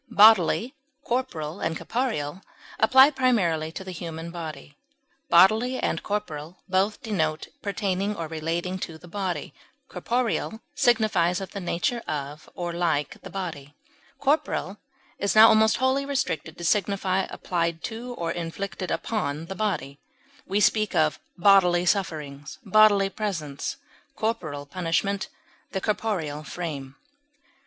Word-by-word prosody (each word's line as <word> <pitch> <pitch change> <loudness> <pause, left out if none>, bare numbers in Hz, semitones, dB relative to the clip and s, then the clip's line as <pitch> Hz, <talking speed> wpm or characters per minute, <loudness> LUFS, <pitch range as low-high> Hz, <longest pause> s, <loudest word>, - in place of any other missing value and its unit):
Bodily, 220 - +5 0.3
corporal, 195 -10 -2
and 160 0 -1
corporeal 190 - -2 0.4
apply 265 +6 +7
primarily 190 - +1
to 190 - -6
the 190 - -7
human 165 -1 -6
body; 155 -4 -7 0.5
bodily 220 +9 +5
and - - -1
corporal 180 -5 -4
both 195 +6 0
denote 160 -9 -1
pertaining 200 0 -1
or 165 -3 -4
relating 165 +4 -3
to 165 -3 -6
the 175 - -14
body; 185 0 -3 0.3
corporeal 235 -2 -1
signifies 215 -10 +2
of 190 -2 -7
the 200 - -5
nature 180 +6 -1
of 145 0 -5
or 175 -1 -3
like 165 -5 -1
the - - -9
body; 160 -7 -6 0.4
corporal 285 +3 0 0.4
is 200 - 0
now 220 +1 +10
almost 220 0 +4
wholly 260 +2 +2
restricted 260 - -2
to 170 - -8
signify 190 0 +1
applied 170 -2 -2
to 240 +2 -5
or 170 -4 -2
inflicted 180 +2 -4
upon 160 -8 -2
the 170 - -6
body; 190 -9 -2 0.5
we 200 +2 +1
speak 215 0 +2
of 155 -1 +2 0.2
bodily 180 -2 +5
sufferings, 150 -7 -2
bodily 205 -1 +5
presence, 165 -11 -3 0.4
corporal 165 -11 -2
punishment, 185 +5 -1 0.5
the 190 - 0
corporeal 185 -8 -2
frame. 145 -6 -6
185 Hz, 125 wpm, -26 LUFS, 160-215 Hz, 0.5 s, now